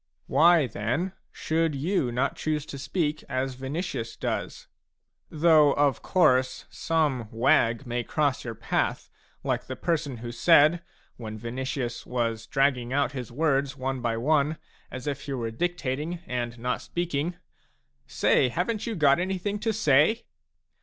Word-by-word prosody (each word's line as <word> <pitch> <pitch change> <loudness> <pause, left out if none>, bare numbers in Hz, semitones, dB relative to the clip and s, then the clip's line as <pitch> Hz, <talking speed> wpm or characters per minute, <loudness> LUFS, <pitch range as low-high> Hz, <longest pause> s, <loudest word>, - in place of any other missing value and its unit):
Why, 170 -2 +5
then, 125 - -2 0.2
should 160 -1 0
you 145 -2 0
not 125 +4 0
choose 155 -2 -2
to 140 - -8
speak 150 +2 -2
as 130 0 -1
Vinicius 130 -2 -4
does? - - -4 0.6
Though 155 -2 +5
of 145 -2 +2
course 130 -7 +2
some 145 -9 0
wag 115 +1 +2
may 120 0 -2
cross 145 +1 0
your 115 -2 -5
path, 115 +2 -2 0.3
like - - -1
the 130 - -4
person 150 -3 -1
who 120 +1 -6
said, 155 +6 +5 0.4
when 110 -2 -7
Vinicius 120 +1 -4
was 115 -3 -2
dragging 135 -3 +1
out 140 -1 +1
his 125 -4 -6
words 140 0 0
one 130 -1 -3
by 115 -1 -1
one, 150 +4 +2 0.3
as 130 -1 -7
if 140 -1 -3
he 140 - -4
were 115 -3 -3
dictating 160 +2 -2
and 120 -1 -3
not 125 +2 -2
speaking: 175 -1 -2 0.4
" - - -45 0.2
Say, 130 - +3
haven't 205 - -2
you 225 -3 -3
anything 185 +7 +2
to 225 +1 0
say 160 - +3
140 Hz, 145 wpm, -27 LUFS, 125-160 Hz, 0.6 s, Why